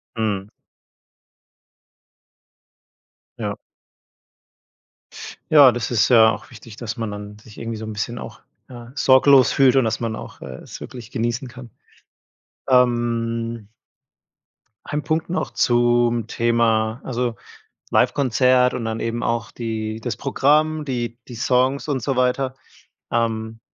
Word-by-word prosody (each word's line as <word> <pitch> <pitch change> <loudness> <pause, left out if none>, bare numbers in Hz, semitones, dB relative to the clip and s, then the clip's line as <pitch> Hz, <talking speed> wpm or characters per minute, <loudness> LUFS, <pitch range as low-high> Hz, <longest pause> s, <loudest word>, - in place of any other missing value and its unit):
Mhm. 105 -3 -2 2.9
Ja. - - -3 1.9
Ja, 145 -5 +8
das 120 -2 -4
ist 115 -1 +3
ja 110 -2 +7
auch 105 - -8
wichtig, 115 -3 -12
dass 115 +1 -6
man 110 -2 -3
dann 105 0 -8
sich 105 0 -16
irgendwie 115 -1 -5
so 110 - -6
'n 110 - -6
bisschen 105 +3 -4
auch, - - -9 0.3
ja, 120 -1 -11
sorglos 130 0 +5
fühlt 135 -1 +4
und, 130 - +4
dass 110 - -2
man 115 -1 -2
auch, - - -10
äh, 65 -1 -8
es - - -10
wirklich 120 -3 -9
genießen 120 +2 -2
kann. 125 0 -11 1.0
Ähm 115 -3 +1 1.2
ein 150 0 -3
Punkt 160 +1 -1
noch 180 - -2
zum 120 -1 +2
Thema, 115 0 +1
also, 120 -2 -2 0.6
Livekonzert 125 -1 +3
und 120 - -3
dann 110 0 -3
eben 115 +1 -3
auch 115 -1 -2
die 110 -1 -4
das 115 -2 -4
Programm, 150 +3 +2
die 120 -3 -4
die 120 - -8
Songs 130 +4 +1
und 135 -3 -1
so 135 -1 -1
weiter. 130 +1 +1 0.6
Ähm, 110 -1 -1
120 Hz, 130 wpm, -21 LUFS, 115-130 Hz, 2.9 s, Ja